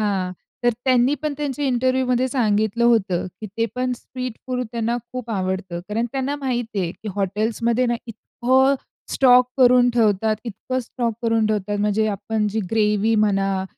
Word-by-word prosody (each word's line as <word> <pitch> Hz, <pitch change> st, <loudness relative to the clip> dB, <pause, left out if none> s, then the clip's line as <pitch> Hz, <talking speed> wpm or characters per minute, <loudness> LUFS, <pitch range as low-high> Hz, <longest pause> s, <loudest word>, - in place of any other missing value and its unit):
हां. 195 Hz, -3 st, -1 dB, 0.3 s
तर 240 Hz, -, +5 dB
त्यांनी 255 Hz, +1 st, +3 dB
पण 305 Hz, -1 st, -1 dB
त्यांचे 290 Hz, -1 st, -2 dB
इंटरव्ह्यू 255 Hz, 0 st, +1 dB
मध्ये 250 Hz, +1 st, +2 dB
सांगितलं 220 Hz, -2 st, +1 dB
होतं 205 Hz, -7 st, +2 dB
की 215 Hz, -, -5 dB
ते 230 Hz, -, +2 dB
पण 250 Hz, 0 st, -1 dB
स्ट्रीट 255 Hz, 0 st, -6 dB
फूड 250 Hz, -1 st, -1 dB
त्यांना 235 Hz, 0 st, -1 dB, 0.2 s
खूप 250 Hz, -2 st, -5 dB
आवडतं. 185 Hz, -3 st, -2 dB
कारण 225 Hz, +3 st, -1 dB
त्यांना 270 Hz, +1 st, -1 dB
माहिती 245 Hz, -6 st, -2 dB
आहे 175 Hz, -2 st, -1 dB
की 220 Hz, -, -9 dB
हॉटेल्समध्ये 220 Hz, +5 st, 0 dB
ना, 240 Hz, -, +1 dB
इतकं 260 Hz, +4 st, +1 dB, 0.4 s
स्टॉक 250 Hz, -2 st, +5 dB
करून 250 Hz, -1 st, +6 dB
ठेवतात, 215 Hz, -1 st, +2 dB
इतकं 245 Hz, +3 st, -4 dB
स्टॉक 235 Hz, -1 st, -3 dB
करून 225 Hz, -1 st, +2 dB
ठेवतात 205 Hz, -1 st, -1 dB
म्हणजे 210 Hz, +1 st, +1 dB
आपण 215 Hz, +1 st, -1 dB
जी 215 Hz, +2 st, -2 dB
ग्रेव्ही 215 Hz, 0 st, +2 dB
म्हणा 195 Hz, -3 st, +1 dB
230 Hz, 160 wpm, -22 LUFS, 210-250 Hz, 0.4 s, करून